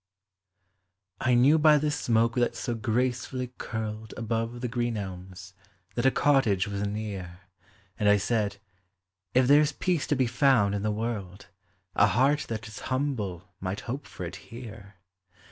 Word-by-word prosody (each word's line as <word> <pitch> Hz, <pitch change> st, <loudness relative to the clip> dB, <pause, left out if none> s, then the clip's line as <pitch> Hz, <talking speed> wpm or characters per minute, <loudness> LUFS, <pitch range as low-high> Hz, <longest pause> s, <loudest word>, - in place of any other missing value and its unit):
I 125 Hz, -1 st, +3 dB
knew 140 Hz, +6 st, +5 dB
by 150 Hz, 0 st, +6 dB
the 150 Hz, +1 st, 0 dB
smoke 115 Hz, -5 st, +2 dB
that 120 Hz, -1 st, +1 dB
so 120 Hz, -, -2 dB
gracefully 125 Hz, +2 st, -1 dB
curled 110 Hz, -1 st, -5 dB
Above 115 Hz, +1 st, -2 dB
the 125 Hz, -, -1 dB
green 120 Hz, -1 st, -1 dB
elms, 95 Hz, -1 st, -7 dB, 0.4 s
that 120 Hz, +5 st, +2 dB
a -, -, +8 dB
cottage 135 Hz, -10 st, +2 dB
was 100 Hz, 0 st, -2 dB
near, 100 Hz, -4 st, -5 dB, 0.6 s
And 105 Hz, -2 st, +3 dB
1 105 Hz, -, +6 dB
said, 105 Hz, -1 st, 0 dB, 0.4 s
" 95 Hz, 0 st, -57 dB
If 130 Hz, 0 st, +5 dB
there 145 Hz, +2 st, +7 dB
's 150 Hz, -, 0 dB
peace 175 Hz, 0 st, 0 dB
to 145 Hz, -, +2 dB
be 130 Hz, -1 st, +2 dB
found 120 Hz, -4 st, +3 dB
in 100 Hz, -, -1 dB
the 105 Hz, -, 0 dB
world, 105 Hz, -4 st, -4 dB, 0.5 s
A -, -, +5 dB
heart 140 Hz, +6 st, +2 dB
that 110 Hz, -1 st, -4 dB
is 110 Hz, +2 st, -9 dB
humble 130 Hz, -, -2 dB
might 95 Hz, +2 st, -3 dB
hope 135 Hz, +4 st, -5 dB
for -, -, -7 dB
it -, -, -6 dB
here! 110 Hz, -4 st, -11 dB
115 Hz, 160 wpm, -28 LUFS, 100-130 Hz, 0.6 s, a